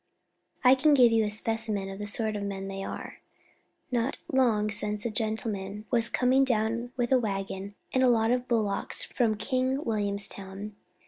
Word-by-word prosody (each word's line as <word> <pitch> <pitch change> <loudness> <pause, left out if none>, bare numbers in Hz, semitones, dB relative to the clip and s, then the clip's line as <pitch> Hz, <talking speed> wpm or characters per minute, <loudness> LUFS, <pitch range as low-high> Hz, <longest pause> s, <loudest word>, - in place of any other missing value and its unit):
I 255 - +7
can 290 +3 +4
give 245 -3 +6
you 225 -1 +3
a - - -1
specimen 215 -2 +1
of 195 0 -8
the 210 - -4
sort 215 +1 +1
of 205 - -3
men 195 -1 -4
they 195 0 -5
are. - - -7 0.7
Not 245 +1 -1
long 225 -5 +2
since 210 +1 +2
a 235 - -1
gentleman 215 -2 -3
was 235 -2 +1
coming 260 +2 +3
down 235 -1 -1
with 245 0 -1
a 260 - +5
waggon 195 -2 -4 0.2
and 260 - +2
a 255 - +5
lot 225 -1 +3
of 250 0 0
bullocks 215 -4 0
from 220 -3 0
King 260 +5 -1
Williamstown. 200 -1 -3
220 Hz, 175 wpm, -28 LUFS, 205-245 Hz, 0.7 s, I